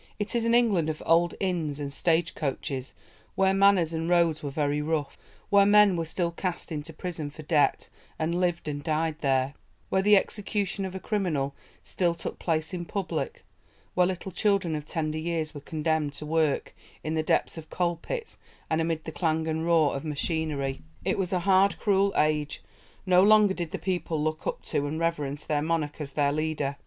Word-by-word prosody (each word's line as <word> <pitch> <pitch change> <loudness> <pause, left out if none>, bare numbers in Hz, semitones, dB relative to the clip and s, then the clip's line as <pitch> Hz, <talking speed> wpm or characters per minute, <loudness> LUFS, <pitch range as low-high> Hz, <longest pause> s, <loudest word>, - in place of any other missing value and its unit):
It 205 +2 -3
is 235 -1 +1
an 230 0 +3
England 205 -10 +3
of 155 - -4
old 170 +1 +3
inns 165 -6 -1
and 140 -1 -4
stagecoaches, 150 -5 -1 0.4
where 190 0 +3
"manners 195 -4 +4
and 165 +1 -2
roads 170 -3 +3
were 145 - -3
very 145 +1 0
rough"; 150 -1 -1 0.4
where 200 0 +7
men 205 -1 +6
were 165 -1 -1
still 170 +1 -1
cast 175 0 -4
into 155 +1 -4
prison 160 -2 -5
for 155 +2 -11
debt 150 -1 +2 0.3
and 170 +2 -1
lived 175 -3 0
and 145 -1 -3
died 160 0 -1
there; 135 -1 +1 0.4
where 190 - +2
the 210 +1 +6
execution 200 -1 0
of 190 0 -6
a - - -3
criminal 170 -11 -1 0.3
still 175 -2 0
took 165 - -6
place 160 +1 -1
in 175 -1 -3
public; 205 - -4 0.5
where 180 -1 +4
little 190 +1 -4
children 195 -3 +1
of 150 -1 -5
tender 155 0 -2
years 160 -1 -2
were 145 - -8
condemned 155 -1 -1
to 150 +1 -7
work 155 -2 0 0.3
in 155 - -2
the 160 - +1
depths 155 - +1
of 160 -1 -9
coal 175 -1 0
pits, 460 - -6 0.3
and 160 +1 +2
amid 160 -1 -1
the 160 - -6
clang 160 -1 0
and 160 +1 -1
roar 160 -4 +4
of 135 - -4
machinery. 150 -3 -2 0.2
It - - 0
was 180 -2 -1
a 180 -2 +1
hard, 195 +1 +4
cruel 200 -1 +2
age. 150 -1 +1 0.4
No 180 -1 +5
longer 210 0 +6
did 175 -3 -4
the - - -4
people 175 -4 -2
look 155 +1 -2
up - - -3
to 145 - -1
and 155 +2 -3
reverence 150 -4 -1
their 150 -1 0
monarch 155 -1 -1
as 140 -2 -6
their 145 -1 +2
leader. 150 -2 -1
165 Hz, 190 wpm, -27 LUFS, 150-185 Hz, 0.5 s, where